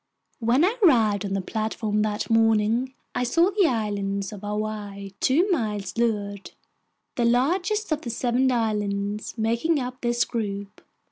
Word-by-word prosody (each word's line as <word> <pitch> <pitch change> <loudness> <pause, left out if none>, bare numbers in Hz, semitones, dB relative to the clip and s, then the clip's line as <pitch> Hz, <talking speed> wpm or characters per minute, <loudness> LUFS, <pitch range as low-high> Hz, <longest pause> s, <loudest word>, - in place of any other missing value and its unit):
When 245 +7 +3
I 435 +6 0
arrived 220 - +4
on 195 - -3
the 195 - 0
platform 215 +1 -2
that 210 0 -1
morning, 225 +3 +2 0.2
I - - 0
saw 335 +10 +3
the 395 -3 +3
Island 200 -5 -1
of 200 - -9
Hawaii 205 -1 -4
two 320 +9 +3
miles 210 - -1
to 235 - -1
leeward, 205 -2 -4 0.7
the 240 - +2
largest 355 - +1
of 310 - 0
the 240 - -5
seven 245 +2 +1
islands 210 -2 -1
making 235 +8 +1
up 250 0 -5
this 240 0 +1
group. 200 -4 -4
225 Hz, 150 wpm, -25 LUFS, 205-255 Hz, 0.7 s, arrived